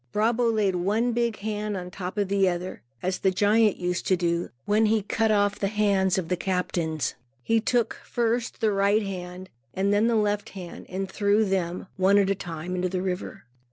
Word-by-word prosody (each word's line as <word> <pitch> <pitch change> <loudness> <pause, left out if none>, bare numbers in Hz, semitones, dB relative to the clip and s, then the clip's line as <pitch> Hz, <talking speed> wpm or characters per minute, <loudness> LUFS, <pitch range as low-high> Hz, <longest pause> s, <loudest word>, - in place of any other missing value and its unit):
Brabo 230 +2 +2
laid 210 -4 +1
one 215 +7 +1
big 235 -1 0
hand 210 0 -3
on 180 0 -6
top 185 +1 -6
of 205 -1 +1
the 195 -1 +3
other, 180 +1 -4 0.2
as 185 +1 -1
the 190 - +3
giant 210 +2 +3
used 180 0 -2
to 185 - +3
do, 170 0 0 0.2
when 215 +1 +3
he 215 -1 +2
cut 220 +2 0
off 205 -1 +2
the 200 - +1
hands 195 -3 +2
of 185 -3 -2
captains. 175 -5 -1 0.3
He 225 - +2
took 230 0 0
first 235 +1 -1
the 220 -1 +3
right 200 +2 +2
hand 185 -1 -6 0.3
and 195 +2 +1
then 210 +3 +3
the 235 - +2
left 210 0 0
hand 180 -2 -8
and 190 +1 -3
threw 205 +2 +2
them, 185 -2 -1
one 190 +2 +4
at 195 -1 +3
a - - +4
time, 175 -2 -6
into 180 0 0
the 185 0 -2
river. 185 -1 -4
200 Hz, 195 wpm, -26 LUFS, 185-215 Hz, 0.3 s, one